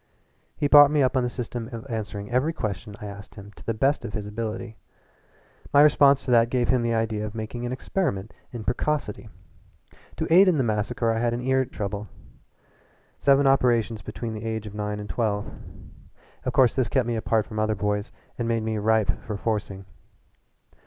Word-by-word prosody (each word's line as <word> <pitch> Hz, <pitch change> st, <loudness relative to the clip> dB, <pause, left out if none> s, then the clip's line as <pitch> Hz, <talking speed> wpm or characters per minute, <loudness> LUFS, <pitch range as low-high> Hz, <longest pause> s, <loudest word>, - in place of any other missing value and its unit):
He 145 Hz, -, +1 dB
brought 145 Hz, 0 st, +8 dB
me 150 Hz, -1 st, +2 dB
up 130 Hz, +1 st, +1 dB
on 130 Hz, -, +3 dB
the 125 Hz, -, -1 dB
system 120 Hz, -1 st, -5 dB
of 115 Hz, +1 st, -7 dB
answering 105 Hz, -3 st, -5 dB
every 130 Hz, +7 st, +1 dB
question 105 Hz, -, -5 dB
I -, -, -8 dB
asked 100 Hz, -1 st, -10 dB
him 100 Hz, -1 st, -11 dB
to -, -, -14 dB
the 115 Hz, -, -2 dB
best 135 Hz, +6 st, +1 dB
of 105 Hz, -, -6 dB
his 105 Hz, -2 st, -4 dB
ability. 110 Hz, +1 st, -5 dB, 0.9 s
My 145 Hz, +1 st, +7 dB
response 140 Hz, -2 st, +5 dB
to 130 Hz, -, -1 dB
that 115 Hz, -1 st, +5 dB
gave 125 Hz, -1 st, 0 dB
him 130 Hz, -2 st, +3 dB
the 115 Hz, -1 st, 0 dB
idea 110 Hz, -1 st, -1 dB
of 105 Hz, +1 st, -6 dB
making 115 Hz, +2 st, -5 dB
an -, -, -4 dB
experiment 125 Hz, -, -2 dB, 0.2 s
in 120 Hz, -3 st, -6 dB
precocity. 120 Hz, -3 st, -2 dB, 0.9 s
To -, -, -1 dB
aid 190 Hz, +3 st, +8 dB
in 180 Hz, -4 st, +3 dB
the 135 Hz, -, +2 dB
massacre 115 Hz, +1 st, 0 dB
I 115 Hz, -, -1 dB
had 120 Hz, 0 st, 0 dB
ear 130 Hz, +1 st, +1 dB
trouble 105 Hz, -2 st, -5 dB, 1.1 s
seven 140 Hz, 0 st, +4 dB
operations 120 Hz, -5 st, +2 dB
between 110 Hz, +1 st, -6 dB
the 110 Hz, 0 st, -6 dB
age 110 Hz, -1 st, -3 dB
of 105 Hz, -, -8 dB
nine 105 Hz, 0 st, -3 dB
and 105 Hz, -, -6 dB
twelve. 105 Hz, -2 st, -2 dB, 0.9 s
Of -, -, 0 dB
course 130 Hz, -3 st, +4 dB
this 130 Hz, -5 st, 0 dB
kept 130 Hz, 0 st, +1 dB
me 120 Hz, -, -1 dB
apart 110 Hz, -1 st, 0 dB
from 110 Hz, -2 st, -6 dB
other 110 Hz, 0 st, +1 dB
boys 105 Hz, +2 st, -2 dB, 0.3 s
and 120 Hz, -, -1 dB
made 115 Hz, -1 st, 0 dB
me 110 Hz, -1 st, -2 dB
ripe 110 Hz, 0 st, +1 dB
for 105 Hz, -2 st, -5 dB
forcing. 100 Hz, -3 st, -3 dB
115 Hz, 195 wpm, -25 LUFS, 105-125 Hz, 1.1 s, brought